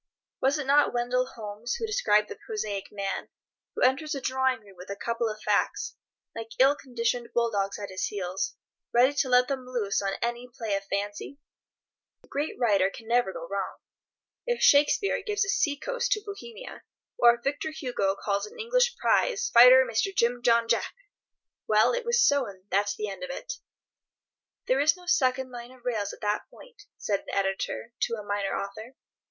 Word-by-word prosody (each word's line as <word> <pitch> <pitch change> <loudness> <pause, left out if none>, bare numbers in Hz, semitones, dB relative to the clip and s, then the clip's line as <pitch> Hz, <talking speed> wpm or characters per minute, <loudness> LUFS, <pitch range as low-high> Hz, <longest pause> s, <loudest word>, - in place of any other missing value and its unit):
Was 270 +3 +2
it 295 - -3
not 280 -1 +4
Wendell 250 +1 +1
Holmes 220 +2 -5
who 455 - -3
described 210 - +2
the - - -7
prosaic 210 - -5
man, 200 -1 -4 0.5
who - - -1
enters 275 +4 +2
a - - -3
drawing 260 -2 0
room 200 -2 -17
with 180 +2 -12
a 200 - -3
couple 230 +2 -2
of 215 0 -6
facts, - - 0 0.4
like 225 0 -7
ill 270 +2 +6
conditioned 240 -3 -2
bull 235 -1 +2
dogs 200 -1 -1
at 200 -2 -7
his 185 - -2
heels, 190 -2 -3 0.4
ready 250 +4 +4
to 285 -2 0
let 250 0 +5
them 265 -2 -4
loose 230 -7 -1
on 195 -1 -1
any 240 +1 -3
play 225 -3 -4
of 195 - -3
fancy? 205 +7 -4 0.9
The - - -22
great 290 +2 -3
writer 200 -6 +3
can 225 +3 -12
never 240 -4 +2
go 165 -2 -7
wrong. 195 +1 -3 0.7
If 485 0 0
Shakespeare 295 +8 +4
gives 420 -2 0
a - - -5
sea 295 -7 +1
coast - - -2
to 425 - -4
Bohemia, 445 +4 -9 0.4
or 235 0 +7
if 240 - -17
Victor 290 +3 -1
Hugo 245 -10 -1
calls 200 0 -2
an - - -14
English 485 +1 +1
prize 485 0 +1
fighter 250 +2 +9
Mr. 230 - 0
Jim 240 +1 +2
John 235 -1 +3
Jack—well, - - -1
it - - -2
was 475 +1 +2
so, 280 -3 +2
and 190 -2 -11
that's 200 +1 +1
an 210 - -2
end 195 +2 -7
of 275 - -5
it. - - -5 1.1
"There 260 - +2
is 305 +5 +4
no 360 - -15
second 260 -7 +1
line 240 -1 -8
of 255 -1 -18
rails 215 -5 -1
at - - -13
that 210 0 -1
point," 475 -4 -16
said 200 -2 -1
an - - -7
editor 195 - -2
to 230 - 0
a 210 - -7
minor 205 -1 -2
author. 215 +6 -7
240 Hz, 190 wpm, -27 LUFS, 205-285 Hz, 1.1 s, fighter